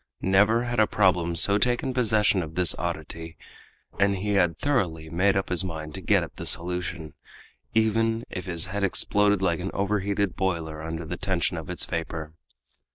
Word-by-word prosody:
Never 105 +5 +4
had 120 -1 -2
a 110 - +5
problem 90 -4 +2
so 100 +4 +3
taken 125 +3 0
possession 110 -5 +3
of 80 -1 -7
this 90 -4 +3
oddity, 80 -1 -5 0.6
and 100 0 +3
he 100 +3 -3
had 90 -5 +2
thoroughly 85 - -1
made 95 +3 +2
up 95 - -1
his 90 0 +2
mind 80 -4 -5
to - - -6
get - - +3
at - - -10
the - - -6
solution, 85 -1 -2 0.6
even 115 +1 +2
if 90 +1 -6
his 85 -2 0
head 100 +2 -3
exploded 100 +1 +1
like 85 -3 +1
an 95 +2 -3
overheated 100 -1 0
boiler 80 -5 -2
under 80 +1 -5
the 90 +3 -5
tension 95 -3 0
of 80 -1 -6
its 90 - +2
vapor. 80 -2 -4
95 Hz, 175 wpm, -26 LUFS, 85-105 Hz, 0.6 s, a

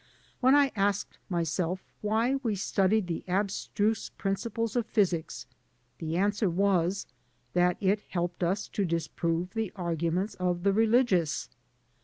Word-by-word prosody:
When 260 +2 +5
I 285 -2 +4
asked 200 0 0
myself 175 +1 -1 0.2
why 225 +5 +1
we 225 -5 0
studied 195 +2 +2
the 170 -2 -4
abstruse 205 +3 0
principles 225 +3 -2
of 235 -2 0
physics, 170 - 0 0.5
the 160 0 -2
answer 205 +1 +2
was 190 0 +1 0.5
that 180 0 +3
it 200 +1 +2
helped 175 0 -2
us 190 +4 0
to 200 - -1
disprove 170 0 -1
the 220 -4 -2
arguments 170 +2 -1
of 180 -1 0
the 200 0 +3
religious. 220 -7 +2
195 Hz, 130 wpm, -29 LUFS, 175-215 Hz, 0.5 s, When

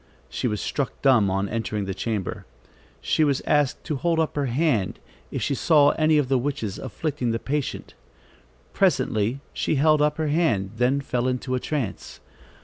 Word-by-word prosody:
She - - -2
was 105 -3 -2
struck 140 -3 -3
dumb 125 -8 +5
on 95 +1 0
entering 105 -1 -3
the 95 - -3
chamber. 105 -1 -4 0.5
She 155 - +2
was 140 -3 +1
asked 145 -3 +1
to 150 -4 -3
hold 165 +3 +1
up 160 - 0
her 145 -2 0
hand, 125 - 0 0.3
if - - -3
she - - 0
saw 145 +1 +4
any 155 0 +3
of 145 -3 +2
the 130 -1 +2
witches 125 -7 -3
afflicting 145 -6 -3
the 115 - 0
patient. 140 +3 -3 0.8
Presently 110 +6 +1
she - - 0
held 155 +1 +4
up 150 0 +2
her 155 -1 -1
hand, 115 - +1
then 130 +4 +2
fell 125 -2 -1
into 130 0 -2
a 130 - +1
trance. 135 -7 -4
135 Hz, 175 wpm, -24 LUFS, 115-150 Hz, 0.8 s, dumb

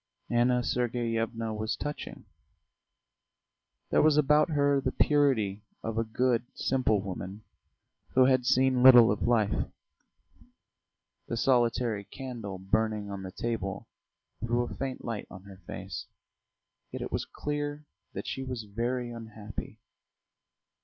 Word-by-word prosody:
Anna 120 +1 +3
Sergeyevna 115 -2 -1
was 110 +1 -2
touching; 145 0 -6 1.7
there - - +5
was 150 -1 +4
about 150 +2 +4
her 145 -2 +2
the - - -1
purity 125 -9 +2 0.2
of 115 0 -2
a - - +2
good, 120 +1 +1
simple 125 -5 +1
woman 95 +2 -6 0.7
who 130 0 +7
had 130 -1 +4
seen 130 0 +3
little 125 -4 +9
of 105 - -2
life. 110 -4 +2 1.6
The 115 - -3
solitary 120 -3 +2
candle 115 -5 -7
burning 105 +2 -1
on 100 -1 -5
the 95 - -6
table 100 -2 -3 0.5
threw 120 +1 +1
a 120 - -6
faint 135 -1 -4
light 115 -3 -4
on 95 -1 -11
her 100 -1 -12
face, - - -6 0.8
yet - - -4
it - - -6
was - - -1
clear 145 0 -3 0.3
that - - -5
she 135 - -4
was 125 -3 -4
very 120 +4 -2
unhappy. 110 -3 -8
120 Hz, 125 wpm, -29 LUFS, 110-130 Hz, 1.7 s, little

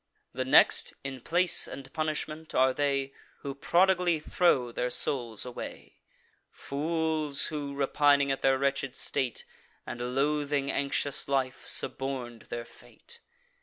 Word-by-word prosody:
The 130 +2 -2
next, 130 - +5
in 135 -2 -6
place 175 +5 +3
and 135 -1 -9
punishment, 155 0 -4
are 130 0 +4
they 140 -1 -1 0.3
Who 140 - -5
prodigally 175 +3 +2
throw 150 -6 +1
their 125 +1 -2
souls 120 -4 0
away; 125 - -9 0.5
Fools, 155 0 -1
who, 145 -2 -4
repining 140 0 +3
at 135 - -1
their 135 0 +3
wretched 135 -1 -1
state, 130 -4 -2 0.4
And 120 +1 -5
loathing 145 0 0
anxious 140 0 -1
life, 135 -2 -1
suborn'd 125 -4 -2
their 120 0 -5
fate. 470 - -15
140 Hz, 125 wpm, -29 LUFS, 130-150 Hz, 0.5 s, next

